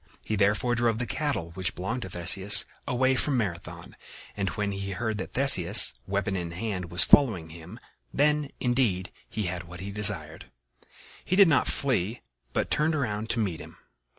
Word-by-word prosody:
He 110 - -2
therefore 105 +4 +1
drove 115 -2 0
the 125 - -3
cattle 120 - -4
which 95 +1 -4
belonged 115 +8 -4
to 95 - -7
Theseus 95 +4 +5 0.2
away 130 +1 +1
from 135 0 -1
Marathon, 90 -7 -6 0.4
and 100 -2 -2
when 105 +1 -3
he 100 0 -5
heard 110 +1 -4
that 95 - -7
Theseus, 110 -7 +6
weapon 100 +1 -2
in 85 -2 -5
hand, 95 -3 -5
was 85 +1 +7
following 105 - +3
him, 80 +1 -12 0.3
then, 150 0 0
indeed, 120 -8 -1 0.2
he 110 - -4
had 90 -1 -5
what 85 +1 -12
he 100 +2 -7
desired. 100 -7 0 0.8
He 185 - -2
did 200 -1 +6
not 145 -5 +2
flee, 120 -5 -2 0.3
but - - -3
turned 155 +1 0
around 110 -6 -3
to 120 - -1
meet 95 -7 -3
him. - - -13
105 Hz, 175 wpm, -26 LUFS, 90-125 Hz, 0.8 s, was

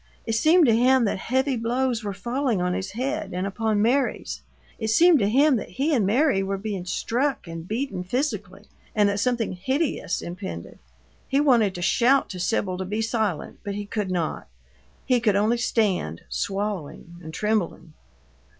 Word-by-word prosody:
It 225 - -1
seemed 315 +9 +5
to 230 -4 +4
him 255 +1 +4
that 200 - -1
heavy 265 +5 0
blows 240 0 -1
were 205 - -2
falling 240 +2 -1
on 180 0 0
his 190 +1 -4
head 265 0 -3
and 185 +1 -1
upon 210 +1 0
Mary's; 260 +4 0 0.4
it 220 - -2
seemed 325 +8 +5
to 200 -2 +2
him 275 +3 +4
that 205 - -6
he 275 - 0
and 220 -8 +2
Mary 250 -1 +3
were 195 0 -2
being 195 -3 -4
struck 250 +8 -1
and 165 0 -8
beaten 215 -4 -3
physically 205 -3 -3 0.3
and 210 -1 +4
that 200 0 -1
something 235 -2 0
hideous 260 - -1
impended. 175 - -7 0.5
He 275 - +2
wanted 235 -9 +3
to 175 - -4
shout 260 +8 +3
to 185 - -6
Sibyl 185 -1 -1
to 190 - -3
be 210 +4 -2
silent, 220 -7 -2
but 200 -2 -4
he 205 0 -4
could 205 -1 -3
not; 175 -4 -2 0.6
he 250 -1 +3
could 215 -4 +2
only 220 +4 +2
stand, 195 - 0
swallowing 195 -4 -4
and 160 -1 -8
trembling. 195 -4 -2
215 Hz, 175 wpm, -24 LUFS, 190-250 Hz, 0.6 s, seemed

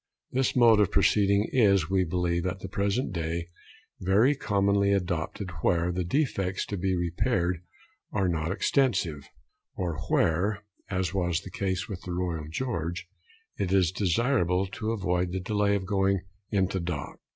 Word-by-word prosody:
This 130 +1 +1
mode 115 -3 +6
of 105 - +4
proceeding 100 +1 +3
is, 100 - +4
we 95 -1 +3
believe 85 0 -1
at 90 +1 -4
the - - -5
present 100 +3 -1
day, 85 0 -3 0.5
very 105 +9 +4
commonly 100 -5 +1
adopted 90 0 -2
where 85 +2 +2
the 90 +1 -1
defects 95 - 0
to 100 - -4
be 95 +1 0
repaired 85 0 0 0.5
are 95 -2 +1
not 85 -1 -1
extensive, 95 - 0 0.5
or 85 -4 -3
where 100 +6 +1 0.3
(as 95 -2 -1
was 90 -3 0
the 95 - -10
case 95 -1 -2
with 95 -4 -6
the 90 - -5
Royal 85 -4 -2
George) 85 -4 -3 0.5
it 95 - -1
is 95 -3 +3
desirable 95 -1 +1
to 100 +4 -4
avoid 90 -4 0
the 95 - -1
delay 100 +1 +1
of 95 -2 -2
going 95 -1 +1 0.3
into 95 -2 +1
dock. 85 -5 -5
95 Hz, 150 wpm, -28 LUFS, 85-100 Hz, 0.5 s, mode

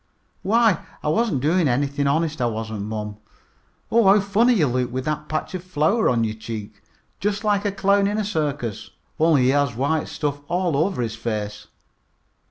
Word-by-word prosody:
"Why, 225 -3 +3 0.2
I 150 - 0
wasn't 165 - +1
doing 165 +2 +3
anything, 140 +3 0
honest 155 0 0
I 120 - +2
wasn't, 110 -2 -4
mom. 105 -1 -5 0.7
Oh, 230 -3 +4
how 200 +2 +7
funny 210 +5 +3
you 170 -8 +3
look 125 -1 -1
with 130 +1 -3
that 150 0 -3
patch 155 - -3
of 185 -2 -5
flour 185 +6 +1
on 115 -2 +2
your 110 -1 -1
cheek! 110 -1 -8 0.4
Just 205 +1 -1
like 205 -1 +1
a 205 - +1
clown 200 0 +2
in 205 +1 -1
a 215 - -1
circus, 145 - -3 0.3
only 155 -4 +4
he 125 - +3
has 140 -3 +1
white 145 +5 0
stuff 145 -1 -3
all 175 -3 0
over 160 -2 0
his 115 -1 -3
face." 105 -2 -4
150 Hz, 180 wpm, -22 LUFS, 120-195 Hz, 0.7 s, how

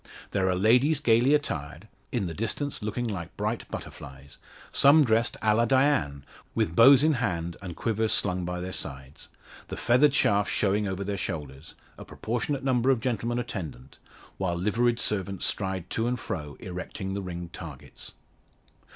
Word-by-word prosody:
There 95 -1 +1
are 90 - +1
ladies 125 - +4
gaily 125 +1 +4
attired 80 - -4 0.2
in 115 -6 -1
the 85 - -4
distance 115 - -3
looking 110 +3 -2
like 90 -6 -6
bright 105 +3 -3
butterflies 70 0 -9 0.3
some 150 +3 +6
dressed 115 0 +1
a 110 -1 +4
la 115 +2 +3
Diane, 130 - +2 0.3
with 80 - 0
bows 130 +5 +8
in 155 0 +4
hand, 90 - -2
and 90 -4 -7
quivers 110 -1 0
slung 90 -2 +1
by 90 0 -3
their 90 +1 -5
sides, 65 0 -7 0.4
the - - -6
feathered 135 +4 +4
shafts 100 -6 +2
showing 105 0 +1
over 95 +1 -3
their 100 0 -3
shoulders; 75 -3 -6 0.2
a - - -7
proportionate 120 +5 -3
number 130 -1 +2
of 130 -3 +3
gentlemen 120 0 -1
attendant; 90 - -6 0.4
while 90 -3 0
liveried 115 +6 +1
servants 100 -4 -2
stride 95 -3 -2
to 115 +1 0
and 125 0 -1
fro 75 -2 -5
erecting 95 +1 -6
the 100 - -3
ringed 85 -2 -7
targets. 75 -7 -10
105 Hz, 160 wpm, -27 LUFS, 90-120 Hz, 0.4 s, bows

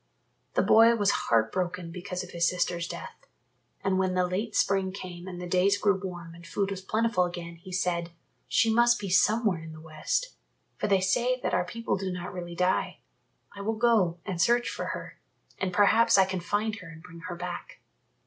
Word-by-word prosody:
The - - +3
boy 230 +1 +6
was 205 -3 +3
heart 110 -1 +1
broken 180 -2 -3
because 180 +1 -5
of 180 - -11
his 170 0 +2
sister's 175 -1 -1
death. - - -9 0.6
And 190 -1 +1
when 185 -1 +1
the 180 0 +3
late 200 +4 -3
spring 195 -1 +2
came 180 -2 -8
and 180 -2 -7
the 180 - -5
days 185 +3 +3
grew 205 -1 +3
warm 175 -3 -6
and 170 0 -13
food 195 +4 -2
was 190 -1 -4
plentiful 215 -1 +1
again, 170 -1 -7
he 180 +3 -12
said, 175 -2 -1 0.4
"She 225 -1 +3
must 240 +1 +5
be 200 -2 -4
somewhere 205 -1 +3
in 160 0 -9
the 155 - -11
West, 160 - -2 0.4
for - - -2
they 195 -2 +3
say 245 +7 +1
that - - -2
our 180 0 +2
people 230 +2 -2
do 190 -1 -3
not 180 0 -5
really 175 -1 -6
die. 180 +1 0 0.6
I 200 - -7
will 220 +2 -1
go 215 -8 +3
and 180 -4 -2
search 240 +5 +3
for - - -4
her, - - -6 0.4
and 190 -1 -1
perhaps 215 +4 +5
I 190 - +6
can 190 -1 -3
find 210 +4 -1
her 185 -5 -10
and 160 0 -12
bring 170 -2 -12
her 175 - -5
back." 175 0 -7
185 Hz, 205 wpm, -28 LUFS, 175-205 Hz, 0.6 s, boy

